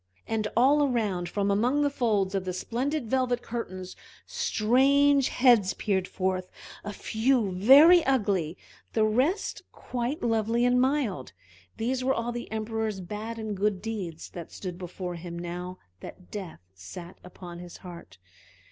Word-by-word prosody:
And 220 -1 -1
all 275 +5 +5
around, 210 -10 0
from 200 +1 0
among 250 +8 +2
the 290 - +3
folds 210 -8 0
of 195 -1 -1
the 185 -1 -3
splendid 260 - -2
velvet 250 +1 0
curtains, 185 -6 -6 0.3
strange 275 +5 +3
heads 235 -7 +4
peered 190 -3 -1
forth; 185 -1 -2 0.3
a 205 - -5
few 220 +1 0
very 280 - +7
ugly, 200 - +1 0.4
the 220 -1 +3
rest 265 - 0
quite 250 +4 -4
lovely 225 +1 +1
and 250 0 +4
mild. 255 - 0 0.4
These 255 +3 -1
were 265 +1 +2
all 230 +1 -2
the 240 -2 -6
Emperor's 220 -1 -2
bad 210 +5 -6
and 220 -2 -4
good 200 0 0
deeds, 190 -6 -6
that 170 -2 -8
stood 180 -2 -7
before 180 0 -5
him 170 0 -7
now 180 +1 -6 0.2
that 180 - -12
Death 190 - -7
sat 170 - -10
upon 175 -1 -10
his 175 -1 -10
heart. 175 - -11
215 Hz, 150 wpm, -27 LUFS, 185-250 Hz, 0.4 s, very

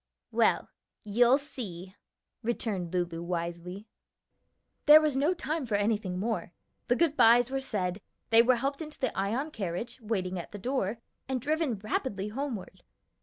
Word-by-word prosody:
"Well, - - +3 0.4
you'll 240 +5 +4
see!" 195 - -7 0.5
returned 220 -7 -2
Lulu 175 -2 -1
wisely. 175 +3 -4 1.0
There 300 +1 +11
was 305 -3 +1
no 295 +7 +2
time 310 -3 -3
for 215 - 0
anything 205 -3 0
more; 215 -2 -2 0.3
the 245 - +3
good 320 0 +2
bys 240 +1 +6
were 270 - 0
said, 200 -7 -2 0.3
they 225 0 +8
were 250 +2 +4
helped 275 +5 -2
into 305 -1 -8
the 260 - -1
Ion 230 +11 -1
carriage, 220 - -4
waiting 190 -5 -2
at 170 - -9
the - - -5
door, 235 -1 -1 0.3
and 260 -1 0
driven 300 -2 0
rapidly 205 0 -2
homeward. 245 -3 -5
225 Hz, 150 wpm, -29 LUFS, 190-265 Hz, 1.0 s, There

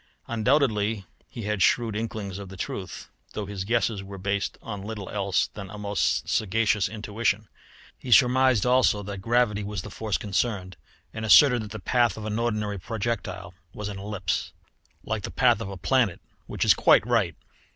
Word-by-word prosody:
Undoubtedly 110 -4 +1 0.2
he 115 - -7
had 105 -1 -2
shrewd 110 +4 +2
inklings 105 -3 -4
of 100 -2 -8
the 95 - -10
truth, 95 0 -6 0.3
though 105 - -4
his 100 -1 -5
guesses 115 -1 0
were 100 0 -9
based 100 +1 -2
on 105 -4 -6
little 105 -1 -6
else 100 -2 +1
than 100 -3 -9
a 105 - -8
most 105 -1 0
sagacious 105 0 +1
intuition. 110 0 -2 0.5
He 125 - -7
surmised 130 -2 +5
also 125 -4 +3
that 100 -1 -6
gravity 115 -1 +1
was 100 -2 -4
the 105 - -9
force 110 -2 -2
concerned, 95 -2 -2 0.4
and 110 - -5
asserted 125 +2 +7
that 105 - -7
the 110 - -6
path 120 +4 +1
of 110 - -6
an 110 +1 -2
ordinary 105 -4 -1
projectile 115 +2 -4 0.2
was 105 -1 -4
an 100 -1 -6
ellipse, 100 -4 -3 0.5
like - - -2
the - - -5
path - - +3
of 95 - -4
a 95 - -7
planet 120 -1 +1 0.3
which - - -1
is - - +7
quite - - +5
right. - - +1
105 Hz, 175 wpm, -26 LUFS, 100-115 Hz, 0.5 s, asserted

